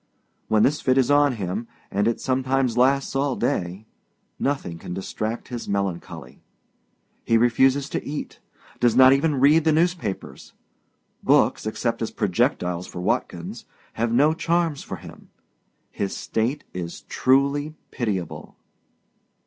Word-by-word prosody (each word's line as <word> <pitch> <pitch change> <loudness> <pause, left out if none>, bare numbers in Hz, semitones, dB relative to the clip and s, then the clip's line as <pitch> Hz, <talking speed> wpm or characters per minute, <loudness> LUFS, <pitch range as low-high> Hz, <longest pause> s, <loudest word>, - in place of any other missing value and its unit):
When 110 -1 +3
this 150 +3 +2
fit 130 0 +2
is 130 +1 +3
on 145 -1 +4
him 105 +1 -4 0.2
and 100 +2 +1
it 115 - 0
sometimes 130 -1 0
lasts 135 +2 +2
all 135 -1 +1
day 95 -3 -2 0.5
nothing 135 -12 -2
can 90 - -6
distract 110 +4 -4
his 120 -4 -6
melancholy. 95 -9 -4 0.8
He 115 - +3
refuses 130 +4 +3
to - - -3
eat, 150 +1 -6 0.4
does 120 -2 +3
not 130 +1 +8
even 140 0 +1
read 150 +4 +5
the 160 - +3
newspapers; 165 - -2 0.7
books, - - +3
except - - -2
as - - -1
projectiles 90 0 0
for - - -8
Watkins, 90 - -3 0.3
have 115 +1 -1
no 145 +6 +4
charms 165 -2 0
for - - -6
him. - - -13 0.6
His 100 -1 -3
state 120 +7 -2
is 85 -2 -6
truly 140 +3 +1 0.2
pitiable. 100 - -4
130 Hz, 135 wpm, -24 LUFS, 105-140 Hz, 0.8 s, not